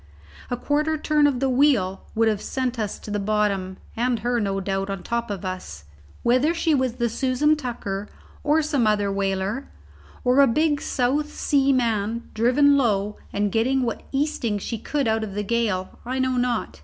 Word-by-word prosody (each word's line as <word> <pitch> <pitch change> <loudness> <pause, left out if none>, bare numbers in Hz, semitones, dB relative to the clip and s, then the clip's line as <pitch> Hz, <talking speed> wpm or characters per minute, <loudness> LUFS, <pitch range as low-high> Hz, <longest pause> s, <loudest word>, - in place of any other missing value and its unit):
A 245 - -1
quarter 300 +4 0
turn 300 -1 +3
of 270 -4 0
the 270 - +1
wheel 250 -8 +2
would 225 0 +3
have 215 -2 +1
sent 255 -2 -2
us 210 -2 -2
to 210 - -9
the 205 - -1
bottom, 200 -2 0 0.2
and 240 +1 +1
her, 240 0 0
no 195 -2 -1
doubt, 195 0 -2
on 195 -2 -4
top 235 -1 -2
of 200 -1 -4
us. 185 - -6 0.4
Whether 255 +8 +3
she 330 -1 +1
was 260 -4 +1
the 235 -1 0
Susan 260 +5 +2
Tucker, 210 -8 -4 0.3
or 305 +2 +3
some 285 -7 +1
other 205 -2 +2
whaler, 195 +5 -2 0.5
or 250 +1 +3
a 280 - +7
big 295 +4 +1
South 285 +4 0
Sea 275 -2 +2
man 230 -3 0
driven 275 +6 +4
low 210 -5 +1
and 205 0 0
getting 255 +5 +2
what 230 -2 -2
easting 270 -6 0
she 220 +3 -4
could 280 +2 -1
out 220 0 +1
of 200 -3 -6
the 210 - -1
gale, 210 -4 -1
I 255 +2 -3
know 260 0 +1
not. 245 -2 -1
235 Hz, 185 wpm, -24 LUFS, 205-270 Hz, 0.5 s, a